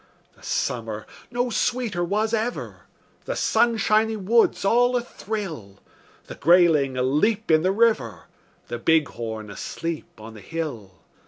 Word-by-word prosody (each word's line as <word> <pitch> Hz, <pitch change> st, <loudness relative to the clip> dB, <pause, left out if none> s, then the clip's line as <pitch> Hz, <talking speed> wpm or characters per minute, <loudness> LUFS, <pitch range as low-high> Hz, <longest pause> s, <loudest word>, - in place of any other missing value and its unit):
The -, -, -23 dB
summer 110 Hz, -3 st, -3 dB, 0.2 s
no 245 Hz, 0 st, -1 dB
sweeter 225 Hz, -6 st, -1 dB
was 215 Hz, +5 st, 0 dB
ever; 230 Hz, +2 st, -3 dB, 0.4 s
The -, -, -3 dB
sunshiny 220 Hz, -1 st, +2 dB
woods 215 Hz, +2 st, +2 dB
all 245 Hz, +4 st, +3 dB
athrill; 195 Hz, -, -6 dB, 0.5 s
The -, -, -8 dB
grayling 160 Hz, -5 st, +4 dB
aleap 160 Hz, -, +1 dB
in 155 Hz, 0 st, +5 dB
the 185 Hz, +3 st, +2 dB
river, 205 Hz, -, +1 dB, 0.4 s
The 120 Hz, -, -5 dB
bighorn 115 Hz, -8 st, 0 dB
asleep 165 Hz, +6 st, -6 dB
on 110 Hz, +1 st, -10 dB
the 110 Hz, -, -12 dB
hill. 120 Hz, -, -6 dB
175 Hz, 120 wpm, -24 LUFS, -, 0.5 s, in